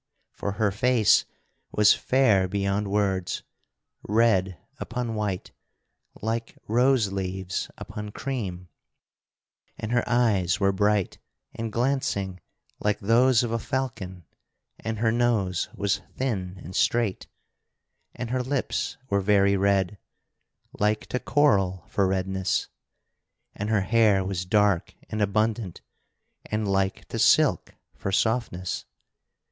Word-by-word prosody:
For 100 - -4
her 105 -1 +1
face 115 +1 +3 0.5
was 105 -1 +6
fair 110 -8 +3
beyond 100 +1 -1
words; 100 -3 0 0.6
red 100 -5 +2 0.2
upon 120 -1 -3
white, 105 -4 -3 0.7
like 115 +1 -3
rose 120 -2 +3
leaves 95 -1 -3
upon 105 0 -7
cream; 105 -8 -4 1.1
and 110 - -5
her 120 0 +2
eyes 105 -7 +2
were 100 -1 +3
bright 105 0 +1 0.3
and 115 -1 -4
glancing 115 -6 -1 0.4
like 105 -1 0
those 120 +3 +4
of 120 - -2
a 115 - 0
falcon, 110 -10 -4 0.5
and 110 -1 -4
her 110 +1 +2
nose 110 -7 +1
was 100 0 0
thin 95 -8 -3
and 90 +3 -9
straight, 115 -5 +1 0.9
and 120 -1 -5
her 130 0 +1
lips 130 +1 -2
were 100 -4 +1
very 100 0 +4
red, 100 0 +1 0.8
like 105 +1 +1
to 125 - -1
coral 95 - +2
for 100 -2 +1
redness, 95 0 -1 0.8
and 105 +1 -4
her 110 -2 +2
hair 105 -2 +3
was 95 -2 -3
dark 100 -2 +2 0.2
and 110 - -2
abundant 105 -1 0 0.7
and 105 -1 -1
like 95 -1 0
to - - -4
silk - - +3 0.2
for 95 - -4
softness. 100 -4 -1
105 Hz, 120 wpm, -26 LUFS, 95-115 Hz, 1.1 s, was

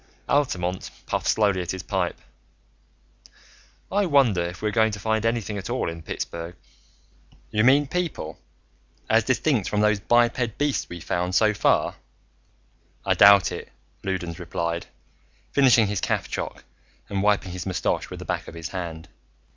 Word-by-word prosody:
Altamont 95 -11 0 0.2
puffed - - -2
slowly 100 -4 +2
at 90 - -6
his 95 -2 -3
pipe. - - -2 1.7
"I 200 -1 +2
wonder 135 - +4
if 85 +2 -4
we're 105 - +1
going 110 0 +3
to 100 - -5
find 110 +2 0
anything 110 -3 -2
at 95 - -7
all 125 +2 -1
in 85 0 -9
Pittsburgh." 85 +2 -5 1.0
"You 110 0 +2
mean 140 +4 +5
people, 165 - -3 0.7
as 110 0 +4
distinct 130 - +1
from 105 - +1
those 105 -1 +3
biped 120 +1 +2
beasts 145 -1 0
we've 85 -1 -8
found 90 +1 -1
so 110 -1 +4
far? 100 - +2 1.1
I - - +3
doubt 100 -1 +7
it," - - -7 0.3
Loudons 90 -3 -3
replied, 85 -1 -3 0.6
finishing 125 -5 +5
his 100 -2 -2
caffchoc - - -3 0.4
and 100 -1 -2
wiping 100 -2 +2
his 90 +1 -5
mustache 90 -2 -1
with - - -7
the - - -8
back - - -3
of - - -9
his 85 +1 -6
hand. 85 -3 -6
100 Hz, 150 wpm, -24 LUFS, 90-120 Hz, 1.7 s, doubt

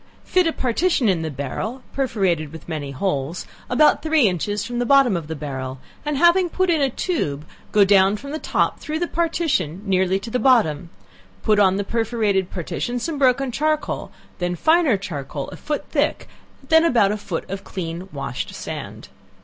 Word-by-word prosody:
Fit 365 -2 +3
a - - +2
partition 265 +1 +1
in 185 -5 +2
the 160 - -3
barrel, 155 - -5
(perforated 190 - 0
with 160 -1 -11
many 155 -4 -4
holes,) 140 +1 -2 0.2
about 300 +5 +4
three 315 -6 +3
inches 205 +3 -1
from 240 +1 -3
the 245 - 0
bottom 275 -6 +5
of 165 -3 -4
the 160 - -4
barrel, 135 -3 -5 0.3
and 295 -1 -1
having 345 +3 +4
put 370 +1 +1
in 320 -3 +2
a 275 - +3
tube, 230 - -2
to 155 - -17 0.2
go 205 -1 +5
down 195 +1 +4
from 280 +6 -8
the 310 - -3
top - - 0
through 305 +1 -3
the 345 - 0
partition 325 - 0
nearly 190 -1 +2
to 225 +3 -8
the 250 - 0
bottom, 195 - +3 0.5
put 210 -1 +3
on 190 -2 +4
the 200 - -1
perforated 215 -4 0
partition 240 +7 -3
some 290 +4 -3
broken 265 0 +3
charcoal, 305 +4 -1 0.3
then 175 0 -1
finer 315 - +3
charcoal 145 -6 -5
a - - -9
foot 300 -1 -4
thick, - - 0 0.4
then 320 +2 +5
about 230 -11 +3
a - - 0
foot 185 -5 -5
of 195 +1 -5
clean 175 0 -6
washed 135 -3 -5
sand. - - -7
210 Hz, 185 wpm, -22 LUFS, 170-280 Hz, 0.5 s, bottom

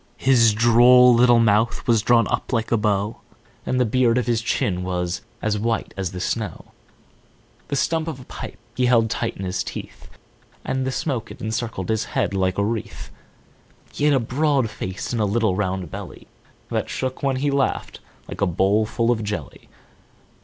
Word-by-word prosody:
His 115 -5 +4
droll 120 +2 +6
little 120 0 +5
mouth 110 +1 +2
was 115 -3 +4
drawn 115 +1 +3
up - - -2
like 115 -3 -1
a - - +4
bow, 105 -1 0 0.5
And 130 - 0
the 125 - +3
beard 120 +1 +2
of 125 - 0
his 115 -2 0
chin 95 -5 -1
was 90 -1 -2 0.2
as 105 -1 0
white 115 0 -2
as 95 -3 -3
the 90 - -6
snow; - - -4 1.0
he 140 - -1
stump 160 +3 0
of 155 -5 -5
a - - -10
pipe - - -8 0.2
he 125 -1 +1
held 115 -2 +3
tight 115 - -2
in 95 - -5
his 90 0 -2
teeth, - - -9 0.6
And 130 0 -1
the - - -1
smoke 130 -5 -3
it - - -11
encircled 110 -3 -4
his 110 -1 0
head - - +1
like 95 -1 0
a 100 - +1
wreath; 110 0 -5 0.8
He 145 - -1
had 150 -1 +4
a - - +3
broad 130 0 0
face 95 +2 -5
and 115 - 0
a - - +2
little 105 -1 +1
round 95 -4 -2
belly, - - -8 0.5
That - - -1
shook 130 0 -3
when 135 -1 +1
he 140 +2 0
laughed, 140 -1 -1 0.3
like - - -8
a 100 - +3
bowlful 105 +6 +1
of 110 -2 -1
jelly. 105 0 -6
115 Hz, 185 wpm, -22 LUFS, 105-125 Hz, 1.0 s, droll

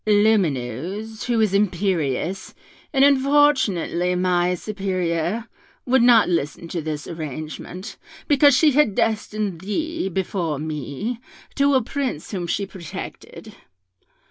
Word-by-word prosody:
Lumineuse, 205 - +1
who 240 -2 +1
is 210 -3 +2
imperious, 185 -4 0 0.4
and 270 -1 +5
unfortunately 265 - +3
my 180 0 +1
superior, 185 +1 -2 0.4
would 260 0 +3
not 235 -2 +6
listen 165 -1 -2
to 170 - -3
this 150 -1 -4
arrangement, 155 +3 -7 0.3
because 285 -2 +5
she 310 -2 +5
had 270 -7 +3
destined 215 -5 -1
thee, 315 - -2
before 175 -4 -2
me, 155 - -4 0.3
to 280 0 +3
a 260 - +3
Prince 255 - -4
whom 180 -4 -3
she 200 +4 -1
protected. 180 -4 -9
195 Hz, 115 wpm, -22 LUFS, 170-235 Hz, 0.4 s, not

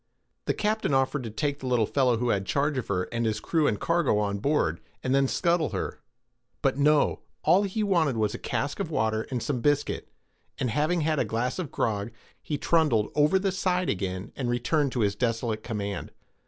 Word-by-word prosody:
The - - 0
captain 215 -9 0
offered 135 +2 +1
to - - -4
take 140 +6 -2
the 130 - -5
little 120 -3 +3
fellow 125 -1 +2
who 120 +1 0
had 100 -3 +1
charge 145 +1 +1
of 125 - -6
her, 90 -2 0
and 115 -1 -1
his 110 -1 0
crew 160 +3 +1
and 105 - 0
cargo 170 -10 +2
on 100 -1 0
board, 105 - +1 0.2
and 130 - 0
then 135 0 +4
scuttle 170 +1 +1
her; - - -3 0.6
but - - +2
no—all 150 +4 +2
he 205 +2 -1
wanted 165 - +2
was 110 -2 +1
a - - -5
cask - - -2
of - - -2
water 110 0 0
and 125 -3 -2
some 135 -5 -1
biscuit; 145 +2 0 0.5
and 125 - -1
having 155 +5 +1
had 155 -1 +1
a - - +3
glass 120 - -2
of 160 -5 -4
grog, 105 -5 -1 0.3
he 150 - -3
trundled 145 -9 +2
over 150 +5 +4
the 195 0 0
side 180 -1 0
again, 95 -1 -4
and 125 -3 -2
returned 135 +4 +1
to 125 - 0
his 100 -2 +2
desolate 115 -1 -1
command. 100 -3 -4
130 Hz, 200 wpm, -27 LUFS, 110-155 Hz, 0.6 s, then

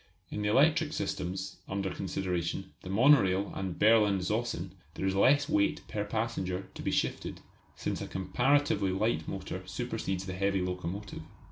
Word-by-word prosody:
In 105 - -3
the 105 - +1
electric 150 +5 +4
systems 95 +1 -3
under 95 -1 -2
consideration 95 0 -3
the 90 - -8
monorail 100 -4 +4
and 95 -2 -4
Berlin 105 -2 +5
Zossen 95 -1 -2 0.2
there - - -3
is 95 - +2
less 140 +9 +4
weight 100 0 +1
per 105 - -2
passenger 95 -4 -2
to - - -8
be - - -1
shifted, - - -1 0.3
since - - -3
a - - -4
comparatively 120 +2 +2
light 95 -4 0
motor - - -5
supersedes 95 0 -3
the 95 - -4
heavy 100 +1 +1
locomotive. 90 +2 -4
95 Hz, 150 wpm, -31 LUFS, 95-110 Hz, 0.3 s, Berlin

